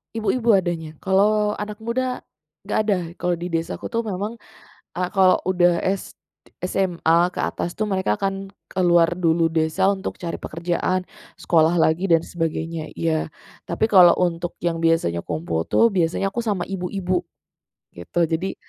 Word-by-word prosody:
Ibu-ibu 230 Hz, +1 st, +2 dB
adanya. 170 Hz, -5 st, 0 dB
Kalau 210 Hz, +2 st, +2 dB
anak 210 Hz, +1 st, -6 dB
muda, 250 Hz, +3 st, -2 dB, 0.5 s
nggak -, -, +1 dB
ada, 205 Hz, -2 st, +2 dB, 0.2 s
kalau 180 Hz, -, 0 dB
di 175 Hz, +1 st, -4 dB
desa 165 Hz, -1 st, -2 dB
aku -, -, -5 dB
tuh 230 Hz, 0 st, -2 dB
memang, 210 Hz, +3 st, -4 dB, 0.6 s
eee, 180 Hz, 0 st, -1 dB
kalau 190 Hz, -2 st, +4 dB
udah 175 Hz, -2 st, +2 dB
s 190 Hz, 0 st, -2 dB, 0.3 s
d -, -, -26 dB, 0.2 s
SMA 175 Hz, -4 st, +1 dB, 0.2 s
ke -, -, -10 dB
atas 175 Hz, -, -3 dB
tuh 215 Hz, -, 0 dB
mereka 190 Hz, -, 0 dB
akan 195 Hz, 0 st, -3 dB, 0.2 s
keluar 175 Hz, -2 st, +3 dB
dulu 165 Hz, -2 st, +1 dB
desa 165 Hz, +4 st, +2 dB
untuk 195 Hz, -1 st, -4 dB
cari 170 Hz, -2 st, -5 dB
pekerjaan, 175 Hz, +3 st, -2 dB, 0.3 s
sekolah 165 Hz, 0 st, +3 dB
lagi 165 Hz, +3 st, +2 dB
dan 165 Hz, -1 st, +4 dB
sebagainya, 165 Hz, -1 st, -3 dB
iya. 160 Hz, -1 st, 0 dB, 0.4 s
Tapi 170 Hz, +5 st, 0 dB
kalau 180 Hz, -4 st, +8 dB
untuk 175 Hz, -1 st, -1 dB
yang 170 Hz, -1 st, 0 dB
biasanya 165 Hz, -, +1 dB
kumpul 80 Hz, 0 st, -3 dB
tuh, 230 Hz, 0 st, +4 dB
biasanya 185 Hz, +1 st, 0 dB
aku 235 Hz, -, -3 dB
sama 205 Hz, -6 st, -1 dB
ibu-ibu, 180 Hz, -1 st, -2 dB, 0.7 s
gitu. 85 Hz, -, -3 dB
Jadi 165 Hz, +4 st, -2 dB
180 Hz, 155 wpm, -22 LUFS, 165-195 Hz, 0.7 s, kalau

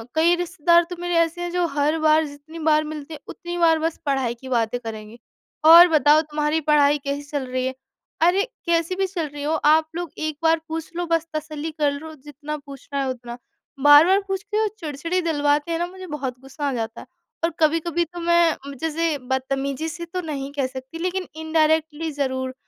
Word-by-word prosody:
कई 335 Hz, +2 st, +4 dB
रिश्तेदार 345 Hz, -1 st, +3 dB
तो 355 Hz, -, -5 dB
मेरे 350 Hz, 0 st, -2 dB
ऐसे 335 Hz, +1 st, +1 dB
हैं, 350 Hz, 0 st, -3 dB
जो 355 Hz, -1 st, +1 dB
हर 295 Hz, +2 st, +1 dB
बार 310 Hz, 0 st, +4 dB
जितनी 290 Hz, +3 st, -11 dB
बार 310 Hz, -1 st, +3 dB
मिलते 305 Hz, 0 st, -7 dB
हैं, 295 Hz, -, -8 dB
उतनी 345 Hz, 0 st, -6 dB
बार 325 Hz, -2 st, +4 dB
बस 325 Hz, +1 st, -2 dB
पढ़ाई 265 Hz, -4 st, 0 dB
की 260 Hz, +2 st, -11 dB
बातें 235 Hz, 0 st, 0 dB
करेंगे। 220 Hz, -1 st, -8 dB, 0.5 s
"और 340 Hz, +2 st, +10 dB
बताओ, 305 Hz, 0 st, +5 dB
तुम्हारी 300 Hz, 0 st, -1 dB
पढ़ाई 295 Hz, -1 st, +4 dB
कैसी 280 Hz, +1 st, -2 dB
चल 285 Hz, -3 st, -2 dB
रही 255 Hz, 0 st, -2 dB
है?" 260 Hz, -, -2 dB, 0.5 s
अरे, 355 Hz, +4 st, +4 dB, 0.2 s
कैसी 335 Hz, +1 st, +1 dB
भी 385 Hz, 0 st, 0 dB
चल 350 Hz, -4 st, -3 dB
रही 290 Hz, 0 st, -8 dB
हो, 305 Hz, +2 st, 0 dB
आप 315 Hz, +1 st, +3 dB
लोग 345 Hz, -1 st, -4 dB
एक 310 Hz, -1 st, -3 dB
बार 325 Hz, 0 st, +4 dB
पूछ 320 Hz, 0 st, -5 dB
लो, 350 Hz, 0 st, -2 dB
बस 330 Hz, -1 st, 0 dB
तसल्ली 310 Hz, 0 st, -4 dB
कर 300 Hz, -2 st, 0 dB
लो 315 Hz, +3 st, -7 dB
जितना 295 Hz, +2 st, -7 dB
पूछना 280 Hz, 0 st, -6 dB
है -, -, -2 dB
उतना। 240 Hz, -1 st, -6 dB, 0.5 s
बार-बार 310 Hz, +7 st, +7 dB
पूछ 385 Hz, 0 st, -3 dB
के, 420 Hz, +1 st, -2 dB
वो 435 Hz, -, +2 dB
चिड़चिड़ी 335 Hz, +3 st, -2 dB
दिलवाते 290 Hz, +1 st, +1 dB
हैं 330 Hz, -, -1 dB
ना, 345 Hz, -, -1 dB
मुझे 375 Hz, +1 st, -10 dB
बहुत 255 Hz, -3 st, -5 dB
गुस्सा 270 Hz, +2 st, -5 dB
आ -, -, -3 dB
जाता 225 Hz, -1 st, -4 dB
है। -, -, -14 dB, 0.4 s
और 335 Hz, -, +3 dB
कभी-कभी 330 Hz, +2 st, +1 dB
तो 350 Hz, +2 st, -10 dB
मैं 335 Hz, -5 st, +2 dB
जैसे, 325 Hz, -1 st, 0 dB
बदतमीज़ी 275 Hz, +3 st, -2 dB
से 340 Hz, +1 st, -6 dB
तो 365 Hz, +2 st, -4 dB
नहीं 275 Hz, -1 st, -4 dB
कह 270 Hz, -2 st, +1 dB
सकती 260 Hz, +4 st, -9 dB
लेकिन 365 Hz, +1 st, -2 dB
इंडायरेक्टली 315 Hz, 0 st, 0 dB
ज़रूर, 260 Hz, -2 st, -2 dB
310 Hz, 200 wpm, -23 LUFS, 285-335 Hz, 0.5 s, और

